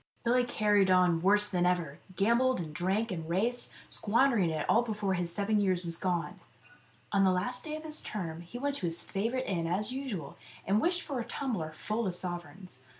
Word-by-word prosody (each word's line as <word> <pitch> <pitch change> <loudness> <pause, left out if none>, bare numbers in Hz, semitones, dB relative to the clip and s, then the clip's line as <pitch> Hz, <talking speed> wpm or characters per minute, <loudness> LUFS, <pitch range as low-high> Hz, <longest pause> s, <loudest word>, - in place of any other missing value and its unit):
Billy 245 +1 +3
carried 210 -5 +2
on 180 -3 +4
worse 205 +3 +4
than 180 -3 0
ever; 175 -4 0 0.2
gambled 235 +5 +3
and 155 -3 -5
drank 195 +7 0
and 165 -3 -5
raced, 230 +8 +1 0.2
squandering 225 -4 +2
it 155 -1 -2
all 230 - +5
before 210 -4 -2
his 175 -2 -1
seven 205 +3 +1
years 185 -3 +1
was 170 -1 +1
gone. 180 +1 -2 0.7
On 200 -1 +3
the 190 - +5
last 225 - -1
day 305 -1 -4
of 310 - -7
his 310 -1 -1
term 170 -6 -5
he 175 +8 -9
went 285 +3 -1
to 175 - -2
his 165 +1 -2
favourite 235 +6 -2
inn 170 -4 -1
as 205 +6 0
usual 255 - -5 0.3
and 205 +3 +2
wished 350 +1 +1
for 275 -4 -4
a - - -2
tumbler 225 - -3
full 215 +6 -2
of 180 - -2
sovereigns. 175 -3 -4
195 Hz, 200 wpm, -31 LUFS, 175-235 Hz, 0.7 s, all